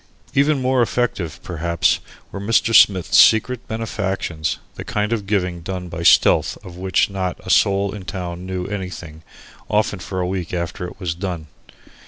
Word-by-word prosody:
Even 140 +1 +3
more 130 0 +2
effective, 100 -9 -1
perhaps, 85 0 0 0.3
were - - -6
Mr. 115 +2 +2
Smith's 95 -5 +5
secret 120 +2 +4
benefactions, 95 - -2 0.2
the - - -7
kind 105 +2 -1
of 105 -4 -3
giving 90 -4 -1
done 90 0 -5
by 85 0 -6
stealth 85 - +4
of 90 - -10
which 95 +2 +1
not 95 -2 -3
a - - -1
soul 100 0 +3
in 105 -3 -7
town 90 -2 -5
knew 95 -1 -4
anything, 90 -5 -6 0.5
often, 105 -2 +1
for 95 +2 -5
a 90 - 0
week 90 -2 -3
after 85 +1 -3
it 90 - -12
was 90 -4 -2
done. 90 -3 -5
95 Hz, 165 wpm, -20 LUFS, 85-105 Hz, 0.5 s, Smith's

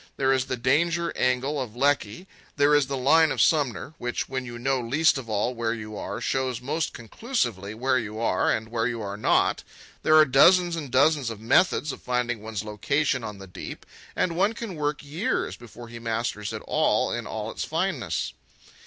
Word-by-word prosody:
There 135 0 +3
is 130 -1 +1
the 130 - -3
danger 165 +7 +1
angle 130 +3 0
of 120 -3 -6
Lecky, 140 - 0 0.3
there 145 +1 +4
is 145 -2 +4
the 135 0 -3
line 155 +4 +4
of - - -3
Sumner, 145 -1 +1
which, 120 0 -3
when 130 -1 -4
you 120 -1 -7
know 130 +1 0
least 145 +7 +3
of 120 -4 -9
all 110 +4 0
where 115 -1 -1
you 110 -1 -8
are, - - -5
shows 130 -3 -1
most 150 +6 -2
conclusively 115 - -3
where 130 +2 +1
you 110 -1 -6
are, 115 - +1
and 110 0 -2
where 115 0 0
you 120 -2 -3
are 100 0 -4
not. 105 - +2 0.4
There 155 - +4
are 155 - +8
dozens 175 +6 +5
and 150 -5 -5
dozens 140 0 +3
of 115 -2 -7
methods 145 - +2
of - - -9
finding 120 -2 -1
one's 110 -2 -5
location 130 +5 0
on 105 -2 -6
the 95 - -10
deep, 90 - -9 0.3
and 170 -2 0
one 200 +5 +2
can 230 -4 -6
work 145 -2 -2
years 155 +8 -2
before 120 0 -12
he 115 0 -9
masters 115 -2 -3
it - - -6
all - - +2
in - - -3
all 110 0 -4
its - - -4
fineness. 150 - -2
130 Hz, 195 wpm, -26 LUFS, 115-150 Hz, 0.4 s, are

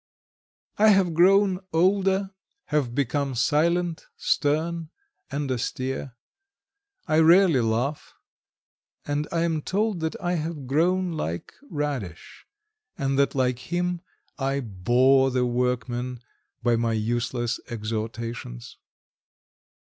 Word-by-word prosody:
I 215 - +6
have 195 -5 +4
grown 190 +2 +4
older, 190 +3 +2 0.4
have 140 -6 0
become 140 0 0
silent, 170 +6 +1
stern, 160 +2 0 0.4
and 140 0 -2
austere, 130 +1 -3 0.9
I 155 - +3
rarely 165 -3 +6
laugh, 120 +6 -2 0.9
and 145 +1 -1
I 165 - 0
am 165 -2 0
told 205 +3 -1
that 160 0 -3
I 175 -1 -1
have 155 -3 -4
grown 175 +7 +1
like 85 - -4 0.2
Radish, 140 - -5 0.5
and 135 0 0
that 140 - +2
like 125 -2 +1
him 175 +3 -2 0.4
I 135 +1 0
bore 125 +6 +3
the 125 -1 +1
workmen 125 0 -2 0.4
by 120 -1 +3
my 115 0 0
useless 120 +2 -1
exhortations. 115 - -5
140 Hz, 105 wpm, -25 LUFS, 120-170 Hz, 0.9 s, I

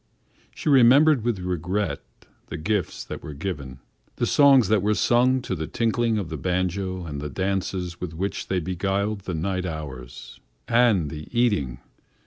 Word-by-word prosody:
She - - -7
remembered 135 0 +6
with 120 -3 0
regret 90 +3 -2 0.5
the - - -6
gifts 100 +4 -2
that - - -7
were 75 - -8
given, 70 -6 -5 0.3
the - - 0
songs 140 -6 +5
that 110 -2 +3
were 105 +2 +1
sung 125 +3 +3
to 95 - -3
the 80 -3 -3
tinkling 115 -1 0
of 95 -6 -3
the 80 - -4
banjo 95 +2 -2
and 75 -3 -5
the 75 - -4
dances 95 0 -3
with 85 -3 -5
which 95 +4 -3
they 95 - 0
beguiled 95 +4 -1
the 90 - -3
night 90 +2 -2
hours. 65 -7 -8 0.3
And 115 - +3
the 75 -1 -7
eating! 70 - +1
95 Hz, 160 wpm, -24 LUFS, 80-110 Hz, 0.5 s, remembered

